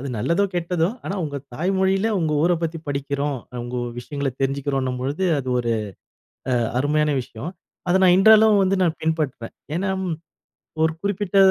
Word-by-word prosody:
அது 140 - -5
நல்லதோ! 170 - +2
கெட்டதோ! 175 -1 0 0.2
ஆனா 195 - -3
உங்க 145 -2 -4 0.2
தாய்மொழில 190 - +1
உங்க 160 -2 0
ஊர 175 +2 +4
பத்தி 165 0 -2
படிக்கிறோம். 140 0 -2 0.2
உங்க 120 +1 -5 0.2
விஷயங்கள 140 +3 -3
தெரிஞ்சிக்கிறோன்னும்பொழுது 135 +2 -1
அது 130 -2 -4
ஒரு 120 -1 0 0.8
அ - - +3 0.2
அருமையான 150 +2 +2
விஷயம். 120 +7 -7 0.4
அத 175 - +3
நான் 180 -1 +7
இன்றளவும் 215 +1 +7
வந்து 195 +1 +2
நான் 170 -2 +1
பின்பற்றுவேன். 155 -7 -2 0.2
ஏனா 190 +4 -1 0.2
ம், 175 -3 -1 0.7
ஒரு 160 0 +3
குறிப்பிட்ட 200 -1 -1
160 Hz, 145 wpm, -22 LUFS, 140-185 Hz, 0.8 s, நான்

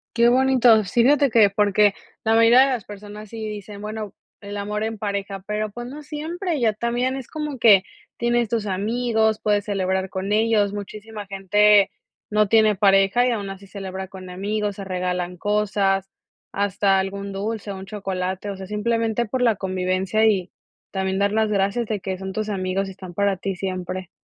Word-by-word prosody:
Qué 235 +1 +5
bonito, 250 -4 +5
sí 215 +5 +1
fíjate 280 +1 +4
que 215 -3 +6
porque 205 0 +3 0.3
la 225 0 +3
mayoría 230 +2 +6
de 270 - +5
las 250 -6 -2
personas 205 0 -10
sí 220 -1 -6
dicen: 205 0 -8
"Bueno 215 -1 -5 0.3
el 205 0 -7
amor 210 +1 -3
en 220 -1 -3
pareja", 200 -2 -4
pero 210 0 -2
pues 240 +2 -7
no 295 +4 -9
siempre, 320 +2 -3
ya 220 -3 +2
también 240 +4 -1
es 265 -3 -7
como 300 -3 -5
que 205 -5 +6 0.3
tienes 240 -1 +1
tus 220 -2 -2
amigos, 220 +2 0
puedes 205 -1 +1
celebrar 190 -2 -1
con 190 +1 -3
ellos, 215 -2 +2
muchísima 210 +1 -7
gente 200 +1 +4 0.4
no 210 -1 +3
tiene 215 -1 +4
pareja 195 +4 +4
y 250 - +2
aún 200 -4 -3
así 195 +1 -9
celebra 190 -1 -6
con 185 -1 -10
amigos, 205 +2 -2
se 200 - -7
regalan 180 -1 -2
cosas, 200 -1 +1 0.4
hasta 200 -1 +1
algún 200 +1 -4
dulce, 205 +1 -4
un 190 0 -8
chocolate, 190 -1 -4
o 195 - -6
sea, 190 -1 -8
simplemente 225 +2 0
por 250 +4 -3
la 230 -4 +4
convivencia 185 +2 0
y 190 -4 +1 0.4
también 190 -1 -1
dar 200 0 +2
las 220 0 +1
gracias 205 +3 0
de 210 -3 -2
que 190 -1 -3
son 190 0 -5
tus 215 +1 -3
amigos 190 0 -1
y - - -7
están 185 -2 -11
para 200 -1 +1
ti 195 0 -3
siempre, 185 -1 -4
205 Hz, 185 wpm, -23 LUFS, 195-225 Hz, 0.4 s, que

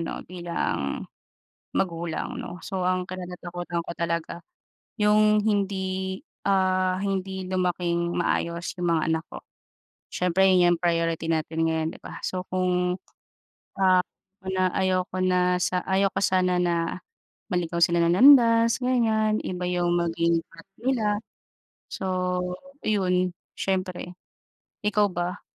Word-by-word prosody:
'no, 165 - -5
bilang 170 - -3 0.7
magulang 170 +7 -2
'no, 180 -7 -7
so 185 -2 -2
ang 185 0 +1
kinatatakutan 175 -1 -5
ko - - -8
talaga 170 -1 -2 0.6
yung 210 0 +4
hindi, 190 -2 -1 0.3
ah, 185 -1 +2
hindi 190 -1 -2
lumaking 175 -2 -1
maayos 170 0 -1
yung 170 -1 +2
mga 155 - 0
anak 160 0 -1
ko. - - -10 0.6
Siyempre 180 +1 +2
'yon 180 -2 +5
'yong 170 - +1
priority 165 -1 0
natin 165 0 0
ngayon 160 -1 0
'di - - -11
ba? - - -10
So, 185 0 -3
kung, 180 -1 0 0.8
ah, 185 -1 +5 0.4
na 185 -1 0
ayaw 185 -1 +1
ko 185 - -2
na 180 -1 +2
sa 180 0 0
ayaw 195 +1 +2
ko - - -1
sana 185 -1 +2
na 170 0 0 0.5
maligaw 170 -1 -1
sila 170 +1 +3
ng 170 - +3
landas 230 -2 +6
ganyan, 225 -4 +2
iba 180 -1 -4
yung 175 -1 +1
maging 170 0 +1
path 165 - -17
nila, 220 -4 0 0.7
so - - -5 0.8
iyon 185 -3 +1 0.2
siyempre. 185 -2 -3 0.7
Ikaw 210 0 +3
ba? 175 +2 -3
180 Hz, 125 wpm, -25 LUFS, 170-190 Hz, 0.8 s, landas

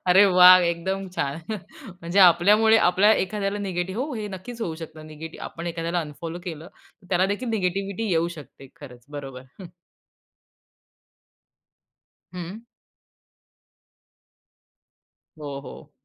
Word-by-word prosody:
अरे 190 +3 +7
वाह! 185 0 +8
एकदम 190 +3 -2
छान. 145 +4 -3 0.6
म्हणजे 170 +4 -2
आपल्यामुळे 210 +6 +6
आपल्या 195 +4 +4
एखाद्याला 205 0 -1
निगेटिव्ह 190 +1 -3
हो, 290 -3 -6
हे 215 -2 -4
नक्कीच 215 +5 -9
होऊ 170 -8 -3
शकतं. 160 -1 -10
निगेटिव्ह 155 +1 -9
आपण 170 +1 -7
एखाद्याला 170 +1 -2
अनफॉलो 160 +2 -7
केलं, 165 -1 -7 0.3
तर - - -19
त्यालादेखील 195 +6 0
निगेटिव्हिटी 195 +1 -2
येऊ 170 0 +1
शकते. 140 -1 -13
खरंच, 125 -4 -12
बरोबर. 135 -3 -8 0.2
हं. 185 - -8 2.7
हं. 185 +7 -7 2.7
हो, 140 -2 -6
हो. 140 - -12
180 Hz, 110 wpm, -24 LUFS, 160-195 Hz, 2.7 s, वाह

